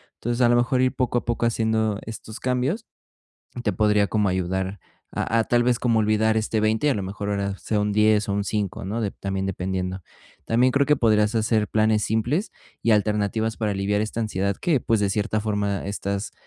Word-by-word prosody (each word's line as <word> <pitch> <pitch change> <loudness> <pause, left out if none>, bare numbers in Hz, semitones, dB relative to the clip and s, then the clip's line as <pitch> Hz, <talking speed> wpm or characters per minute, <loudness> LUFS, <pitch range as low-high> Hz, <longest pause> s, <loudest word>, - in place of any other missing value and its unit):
Entonces, 120 +1 -3
a 120 - +6
lo 120 - +4
mejor 120 +2 +2
ir 130 0 +1
poco 125 -1 0
a - - -14
poco 120 0 0
haciendo 110 -2 0
estos 110 0 -8
cambios 130 - -1 0.8
te 105 - +1
podría 105 0 +3
como 105 -2 +1
ayudar 95 +2 -2 0.3
a 115 - 0
a, - - 0
tal 120 +1 +2
vez, 120 0 +2
como 115 -2 +2
olvidar 110 +1 +2
este, 110 0 -1
20 110 +5 +1
y - - +4
a - - +2
lo 100 - -2
mejor 100 +2 -5
ahora 100 -1 -2
sea 105 -2 -1
un 105 0 0
10 105 0 +3
o - - 0
un 100 0 -1
5, 100 -2 -3
¿no?, 110 +4 -2
de 105 - -1
también 95 -1 -3
dependiendo. 95 0 -3 0.4
También 125 +3 +3
creo 140 +1 +2
que 150 - +4
podrías 105 -3 +2
hacer 110 -1 +1
planes 110 0 +2
simples, 120 - 0 0.3
y 115 - +3
alternativas 105 +1 0
para 105 -2 0
aliviar 100 +1 0
esta 110 +2 -3
ansiedad 100 -2 -1
que, 155 -7 +2
pues, 115 -3 +1
de 100 -1 +1
cierta 105 +2 0
forma 105 -2 -1
estás 100 0 -3
110 Hz, 210 wpm, -24 LUFS, 100-115 Hz, 0.8 s, a